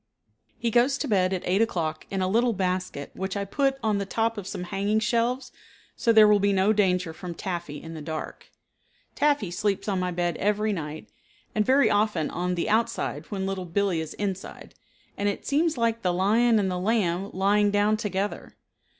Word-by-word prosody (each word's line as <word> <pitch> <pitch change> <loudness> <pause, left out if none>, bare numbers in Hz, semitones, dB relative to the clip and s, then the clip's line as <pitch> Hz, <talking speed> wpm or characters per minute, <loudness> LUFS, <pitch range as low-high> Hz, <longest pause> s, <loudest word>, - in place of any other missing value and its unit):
He 230 -1 -1
goes 250 +4 +3
to 290 - -3
bed 190 -5 +2
at 185 -2 -2
eight 190 +4 +2
o'clock 160 -8 -1
in 195 -1 -1
a - - +1
little 230 +4 +2
basket 185 -6 -2
which 190 +1 -4
I 200 - -2
put 270 +6 0
on 215 -2 +1
the 200 - -2
top 230 +2 0
of 205 -4 -6
some 180 - -5
hanging 200 +4 0
shelves 240 +3 0 0.4
so 230 - +2
there 220 -1 +7
will 210 -1 +5
be 200 0 +2
no 195 +3 +3
danger 180 -5 +1
from 170 +1 -7
Taffy 170 -5 -5
in 165 +2 -9
the 160 - -7
dark. 155 +1 -6 0.6
Taffy 285 -11 +1
sleeps 200 +3 -1
on 195 -3 0
my 180 0 -1
bed 175 -1 -1
every 210 +1 +1
night, 155 -3 -6 0.4
and 215 - +2
very 270 +5 +4
often 205 -6 +1
on 180 +1 -1
the 170 - -1
outside 220 -9 -1
when 195 -2 -3
Little 195 -1 -3
Billee 185 -1 0
is 160 - -7
inside, 195 -2 -5 0.5
and 205 0 +1
it 200 - -5
seems 315 +3 +1
like 230 -1 0
the 180 - +1
lion 220 +6 +3
and 195 -3 +1
the 180 - -2
lamb 195 -2 0
lying 205 +2 +2
down 205 +1 +2
together. 205 -2 -3
200 Hz, 195 wpm, -26 LUFS, 180-220 Hz, 0.6 s, there